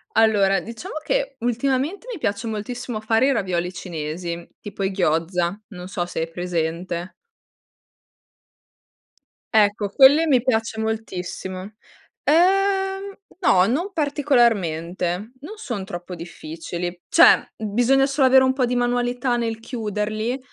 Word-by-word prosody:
Allora, 205 Hz, -3 st, +4 dB
diciamo 235 Hz, -, -8 dB
che 275 Hz, -3 st, -1 dB
ultimamente 265 Hz, -, -1 dB
mi 430 Hz, -, -6 dB
piace 205 Hz, -3 st, -2 dB
moltissimo 230 Hz, +2 st, -4 dB
fare 225 Hz, +3 st, +2 dB
i -, -, +3 dB
ravioli 180 Hz, -6 st, -1 dB
cinesi, 170 Hz, 0 st, -5 dB, 0.2 s
tipo 205 Hz, -1 st, -7 dB
i 195 Hz, -, +1 dB
gyoza, 175 Hz, 0 st, 0 dB
non 180 Hz, -3 st, -9 dB
so 185 Hz, -2 st, -3 dB
se 175 Hz, -, -6 dB
hai 165 Hz, -, -3 dB
presente. 170 Hz, +1 st, -3 dB, 2.4 s
Ecco, 205 Hz, -1 st, +3 dB
quelle 285 Hz, +9 st, +6 dB
mi 260 Hz, -4 st, +4 dB
piace 225 Hz, -3 st, 0 dB
moltissimo. 190 Hz, -3 st, -4 dB, 0.5 s
Ehm, 385 Hz, +3 st, +2 dB, 0.2 s
no, 190 Hz, -, +4 dB
non 335 Hz, -, -1 dB
particolarmente, 215 Hz, -, 0 dB
non 310 Hz, +10 st, -8 dB
son 240 Hz, -, -5 dB
troppo 175 Hz, 0 st, -7 dB
difficili. 170 Hz, +1 st, -6 dB
Cioè, 335 Hz, -, +6 dB
bisogna 245 Hz, +6 st, +2 dB
solo 275 Hz, -1 st, +3 dB
avere 260 Hz, 0 st, +6 dB
un 260 Hz, -, +3 dB
po' 260 Hz, -1 st, 0 dB
di 245 Hz, 0 st, 0 dB
manualità 245 Hz, +1 st, 0 dB
nel 230 Hz, -2 st, -2 dB
chiuderli 215 Hz, +1 st, -3 dB
220 Hz, 125 wpm, -22 LUFS, 180-260 Hz, 2.4 s, quelle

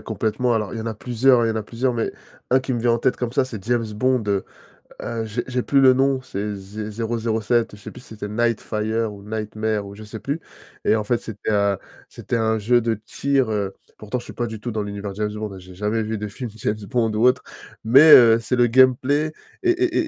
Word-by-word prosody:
complètement, 110 Hz, +2 st, -1 dB
alors, 105 Hz, -3 st, -1 dB
il 115 Hz, -, -4 dB
y -, -, -3 dB
en 110 Hz, -, -5 dB
a 115 Hz, -, -2 dB
plusieurs, 120 Hz, +2 st, +3 dB
il -, -, +1 dB
y -, -, +1 dB
en 110 Hz, -, -4 dB
a 110 Hz, -, -1 dB
plusieurs, 125 Hz, +4 st, -1 dB
mais 115 Hz, -1 st, -2 dB, 0.4 s
un 130 Hz, -, +5 dB
qui 130 Hz, 0 st, -3 dB
me 120 Hz, -, -1 dB
vient 120 Hz, 0 st, +2 dB
en 115 Hz, -, +1 dB
tête 130 Hz, +2 st, +1 dB
comme 120 Hz, -2 st, -3 dB
ça, 130 Hz, -, +2 dB
c'est 110 Hz, -7 st, -8 dB
James 120 Hz, 0 st, +1 dB
Bond, 130 Hz, +2 st, +1 dB
heu, 100 Hz, -1 st, 0 dB, 0.6 s
heu, 115 Hz, -1 st, -3 dB
j'ai 110 Hz, -1 st, -3 dB
j'ai 125 Hz, 0 st, -1 dB
plus 140 Hz, -, +3 dB
le 130 Hz, -1 st, +7 dB
nom, 135 Hz, 0 st, +2 dB
c'est 105 Hz, -4 st, -4 dB
Zé 105 Hz, +2 st, -7 dB
Zéro 115 Hz, +2 st, -2 dB
Zéro 110 Hz, 0 st, -1 dB
Sept, 115 Hz, -1 st, 0 dB
je 105 Hz, -, -17 dB
sais -, -, -8 dB
plus -, -, -12 dB
si -, -, -17 dB
c'était 105 Hz, -1 st, -5 dB
Nightfire 110 Hz, 0 st, -1 dB
ou 100 Hz, -1 st, -12 dB
Nightmare 110 Hz, 0 st, -3 dB
ou 100 Hz, -, -10 dB
je 110 Hz, -, -10 dB
sais 110 Hz, +1 st, -8 dB
plus. 145 Hz, +7 st, -3 dB, 0.4 s
Et -, -, +3 dB
en 105 Hz, -, -3 dB
fait, 120 Hz, +2 st, +1 dB
c'était, 110 Hz, -1 st, -6 dB
heu, 100 Hz, -1 st, +2 dB, 0.3 s
c'était -, -, -4 dB
un 110 Hz, -1 st, +1 dB
jeu 120 Hz, +3 st, +3 dB
de 115 Hz, 0 st, 0 dB
tir, 130 Hz, +4 st, -1 dB
heu- 100 Hz, -2 st, -2 dB, 0.2 s
pourtant, 110 Hz, +4 st, -4 dB
je -, -, -12 dB
suis -, -, -9 dB
pas 120 Hz, -, -2 dB
du 110 Hz, -1 st, -7 dB
tout 120 Hz, +3 st, -4 dB
dans 110 Hz, -1 st, -2 dB
l'univers 100 Hz, 0 st, -5 dB
James 105 Hz, 0 st, -2 dB
Bond, 105 Hz, -1 st, -5 dB
hein, 95 Hz, -, -9 dB
j'ai 90 Hz, 0 st, -13 dB
jamais 105 Hz, +3 st, -1 dB
vu 110 Hz, +1 st, -3 dB
des 105 Hz, +1 st, -4 dB
films 115 Hz, +4 st, -6 dB
James 105 Hz, -, -1 dB
Bond 115 Hz, -4 st, +1 dB
ou 105 Hz, +2 st, 0 dB
autre- 125 Hz, 0 st, +3 dB, 0.4 s
mais, 140 Hz, +8 st, +8 dB
heu, 115 Hz, -5 st, +9 dB
c'est 125 Hz, +3 st, -1 dB
le 120 Hz, 0 st, +5 dB
gameplay 130 Hz, +5 st, +3 dB, 0.3 s
et 360 Hz, -, +2 dB
et 355 Hz, +1 st, 0 dB
et -, -, +3 dB
115 Hz, 260 wpm, -22 LUFS, 105-125 Hz, 0.6 s, heu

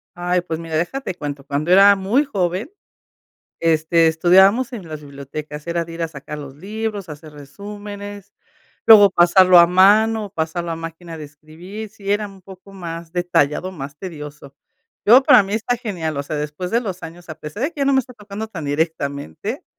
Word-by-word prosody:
Ay, 180 Hz, 0 st, 0 dB
pues, 160 Hz, -2 st, -5 dB
mira, 165 Hz, -1 st, -5 dB
deja, 175 Hz, +12 st, -1 dB
te 185 Hz, -, -5 dB
cuento. 145 Hz, -4 st, -6 dB
Cuando 145 Hz, +5 st, -2 dB
era 200 Hz, +2 st, +7 dB
muy 205 Hz, +10 st, +1 dB
joven, 185 Hz, -5 st, -2 dB, 0.9 s
este, 165 Hz, 0 st, +3 dB
estudiábamos 190 Hz, +10 st, +4 dB
en 195 Hz, -8 st, -7 dB
las 155 Hz, -1 st, -7 dB
bibliotecas, 145 Hz, +1 st, -8 dB
era 170 Hz, 0 st, -1 dB
de 165 Hz, -, -10 dB
ir 165 Hz, -, -6 dB
a -, -, -1 dB
sacar 150 Hz, 0 st, -8 dB
los 140 Hz, -2 st, -9 dB
libros, 210 Hz, +2 st, -5 dB
hacer 155 Hz, 0 st, -10 dB
resúmenes, 205 Hz, +6 st, -9 dB, 0.5 s
luego 205 Hz, -3 st, +9 dB
pasarlo 180 Hz, +1 st, +6 dB
a 170 Hz, -, +8 dB
mano 210 Hz, +4 st, +4 dB
o -, -, -14 dB
pasarlo 170 Hz, 0 st, -3 dB
a 165 Hz, -, -3 dB
máquina 165 Hz, 0 st, -8 dB
de 155 Hz, -, -7 dB
escribir. 160 Hz, +9 st, -10 dB
Sí 200 Hz, -1 st, -7 dB
era 205 Hz, 0 st, -1 dB
un 195 Hz, -1 st, -15 dB
poco 190 Hz, +1 st, -14 dB
más 170 Hz, -3 st, -8 dB
detallado, 175 Hz, 0 st, 0 dB
más 140 Hz, -4 st, -8 dB
tedioso. 150 Hz, -6 st, -9 dB, 0.5 s
Yo, 245 Hz, +6 st, +7 dB
para 245 Hz, -5 st, +7 dB
mí, 195 Hz, +2 st, -4 dB
está 225 Hz, +3 st, -1 dB
genial, 180 Hz, -, -4 dB
o -, -, -1 dB
sea, 150 Hz, +2 st, -5 dB
después 150 Hz, +5 st, -4 dB
de 235 Hz, -, +2 dB
los 190 Hz, -6 st, -6 dB
años, 170 Hz, +2 st, -10 dB
a 155 Hz, -, -6 dB
pesar 150 Hz, +11 st, -8 dB
de 315 Hz, -, -2 dB
que 295 Hz, -, -9 dB
ya 275 Hz, -, +2 dB
no 275 Hz, -, +2 dB
me 265 Hz, -, +4 dB
está 255 Hz, 0 st, -12 dB
tocando 210 Hz, -1 st, -7 dB
tan 170 Hz, -8 st, -7 dB
directamente, 140 Hz, -, -3 dB
175 Hz, 195 wpm, -20 LUFS, 155-205 Hz, 0.9 s, luego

